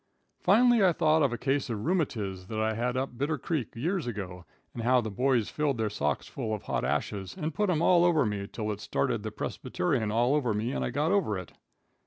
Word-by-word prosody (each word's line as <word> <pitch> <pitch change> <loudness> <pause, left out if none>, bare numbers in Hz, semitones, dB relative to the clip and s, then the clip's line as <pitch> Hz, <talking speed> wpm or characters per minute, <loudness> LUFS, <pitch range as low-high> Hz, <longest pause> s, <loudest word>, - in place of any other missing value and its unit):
Finally 230 +3 +5
I 180 -2 +5
thought 155 -1 +3
of 140 -4 +3
a 120 - -2
case 135 +3 0
of 110 -1 -3
rheumatiz 110 - -1
that 110 +1 -3
I 110 0 +1
had 125 +3 -1
up 135 +1 -1
in 120 - -16
Bitter 150 +4 0
Creek 145 -4 -3
years 165 +5 -1
ago, 95 -6 -5 0.3
and 120 - -5
how 125 +2 +4
the 110 -3 -3
boys 125 0 +1
filled 145 -4 0
their 110 -2 -1
socks 75 -8 -1
full 110 -5 -3
of 105 - -9
hot - - -2
ashes 95 -2 -2
and 160 -3 -3
put 210 +4 0
'em 165 -2 +1
all 175 -1 +5
over 165 -5 +4
me 100 -2 -2
till 110 -2 -3
it 105 0 -5
started - - -1
the - - -4
persbyterian 105 +4 -2
all 120 +4 +2
over 125 -8 +1
me 110 +4 -1
and - - -2
I - - -1
got 150 +3 0
over 190 - +1
it. 90 -2 -8
125 Hz, 235 wpm, -29 LUFS, 105-155 Hz, 0.3 s, Finally